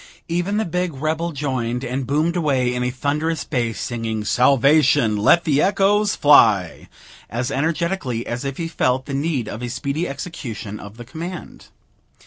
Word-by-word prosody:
Even 175 +4 -1
the 220 - 0
big 180 -2 -2
rebel 155 +4 -2
joined, 130 -4 -2
and 130 +1 -3
boomed 155 +5 +1
away 135 -7 +1
in 125 - -2
a 125 - 0
thunderous 150 +5 -1
bass, 120 -6 -2
singing 115 -3 -3
"Salvation! 135 -1 +4
let 110 +12 +4
the 145 -3 +2
echoes 205 +1 +2
fly," 105 - +4 0.4
as 120 +3 -2
energetically 155 -5 -1
as 120 +3 -4
if 140 -1 -4
he 165 - -3
felt 130 -5 0
the 140 - -6
need 140 -4 -1
of 110 - -6
a 120 - -4
speedy 140 +6 -2
execution 120 - -6
of 105 +2 -11
the 120 - -9
command. 170 +7 -8
140 Hz, 160 wpm, -21 LUFS, 120-165 Hz, 0.4 s, Salvation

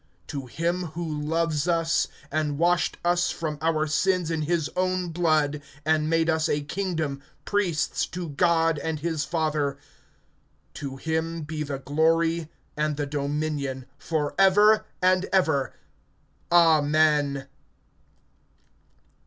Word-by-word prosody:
To 140 -4 -5
him 170 +7 -1
who 175 - -2
loves 155 +1 -1
us, 165 -1 +2 0.2
and 150 -1 -1
washed 175 +2 +2
us 175 0 +2
from 155 -3 -4
our 160 -1 +1
sins 175 +2 +1
in 160 -1 -1
his 160 0 0
own 185 -1 0
blood, 155 -3 +1 0.2
(6)and 155 -1 +2
made 165 0 +2
us 160 -1 +1
a 145 - +1
kingdom, 160 -4 -3 0.2
priests 190 -7 0
to 175 -2 -6
God 165 0 +2
and 155 0 -3
his 160 -2 -1
Father, 155 -4 -1 1.0
to 140 -2 -6
him 160 +2 -2
be 155 0 -5
the 140 -2 -3
glory, 160 +3 +1 0.3
and 150 -1 -1
the 145 - -1
dominion, 140 -2 -2
forever 195 +8 +3 0.2
and 185 +1 +4
ever. 160 -8 +1 0.8
Amen. 150 -4 +3
160 Hz, 120 wpm, -25 LUFS, 150-170 Hz, 1.0 s, and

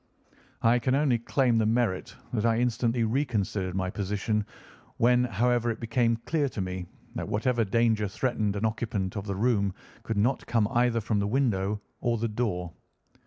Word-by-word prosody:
I 120 +1 +5
can 130 +2 +1
only 135 -5 +2
claim 120 -1 +2
the 110 - +2
merit 115 -4 0 0.2
that 110 -3 0
I 115 -1 +3
instantly 120 0 +1
reconsidered 110 -7 -1
my 95 -1 -1
position 105 +2 -1 0.5
when, 125 +1 +4
however, 120 +2 +1
it 115 - -3
became 115 0 +1
clear 150 -4 +1
to 115 - -7
me 90 -1 -3 0.3
that 120 - -4
whatever 115 +2 +1
danger 110 0 +2
threatened 105 -1 -1
an 100 +2 -1
occupant 110 -4 -2
of 100 0 -4
the 100 - -2
room 100 -3 +1 0.3
could 115 - -3
not 120 +6 +1
come 115 -3 +2
either 120 -2 +2
from 105 0 0
the 100 - 0
window 105 -5 0 0.2
or 120 -1 0
the 115 +1 -1
door. 105 -7 -2
115 Hz, 170 wpm, -28 LUFS, 100-120 Hz, 0.5 s, I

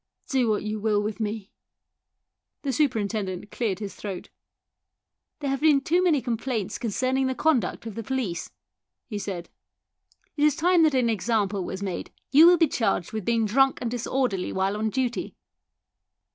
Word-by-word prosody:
Do 255 -4 +2
what 210 - 0
you 215 0 -3
will 210 -1 +2
with 210 +1 -3
me." 210 -2 -4 1.1
The 275 -2 -1
superintendent 210 - -1
cleared 215 -6 -1
his 200 -2 -6
throat. 195 -2 -7 0.6
" - - -60
There 280 - -1
have 275 - -2
been 305 -3 +5
too 345 +6 +1
many 310 -7 +3
complaints 225 -4 -2
concerning 255 +4 0
the 260 - -1
conduct 255 - +1
of 225 - -5
the 230 - -5
police," 230 -7 -3 0.6
he 210 -3 -5
said; 190 -3 -5 0.5
" - - -40
it 290 - +1
is 300 -2 +4
time 345 +1 +3
that 310 -3 +4
an 250 -2 +3
example 210 -2 0
was 190 +2 -5
made. 190 -3 -4 0.2
You 310 +4 +8
will 350 0 +7
be 325 - +4
charged 225 - 0
with 215 -4 -4
being 230 -1 +2
drunk 270 +5 +3
and 235 - -3
dis 245 -1 -3
orderly 245 -9 0
while 190 +1 0
on 220 +1 -1
duty." 250 +1 -2
230 Hz, 175 wpm, -26 LUFS, 205-270 Hz, 1.1 s, You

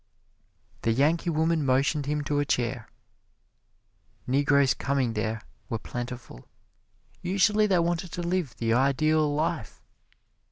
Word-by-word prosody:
The 115 - +1
Yankee 155 +7 +2
woman 160 0 +1
motioned 140 +2 +1
him 150 0 -1
to 145 0 0
a - - +2
chair. 120 -3 -1 1.4
Negroes 140 0 +3
coming 130 -3 -1
there 110 +1 -2 0.3
were 115 - -1
plentiful. 120 - -7 0.7
Usually 210 +3 +2
they 190 -3 +3
wanted 170 0 -1
to 175 - -3
live 170 -6 -1
the 115 -1 0
Ideal 150 +4 +2
Life. 150 -5 -2
145 Hz, 120 wpm, -27 LUFS, 125-165 Hz, 1.4 s, Negroes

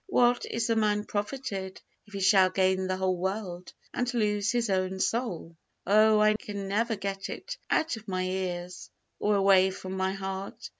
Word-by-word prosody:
"What 245 -9 +3
is 230 -1 -1
a - - +3
man 210 -1 +1
profited, 205 -3 -4 0.3
if 205 - -18
he 195 - -3
shall 190 -1 +5
gain 190 0 +1
the 185 0 -1
whole 185 -1 0
world, 185 -2 -4 0.2
and 250 0 -1
lose 210 -2 +1
his 240 -1 0
own 190 0 0
soul?" 190 -7 -2 0.3
Oh, 215 +2 +5
I 215 0 +5
can 205 -2 -5
never 225 +3 0
get 195 -1 -4
it - - -6
out 315 -7 +1
of 220 - -13
my 185 -1 -1
ears 180 -1 -4 0.3
or 210 0 +2
away 195 -1 +5
from 185 0 -7
my 190 0 0
heart! 195 0 -6
195 Hz, 180 wpm, -28 LUFS, 190-215 Hz, 0.3 s, shall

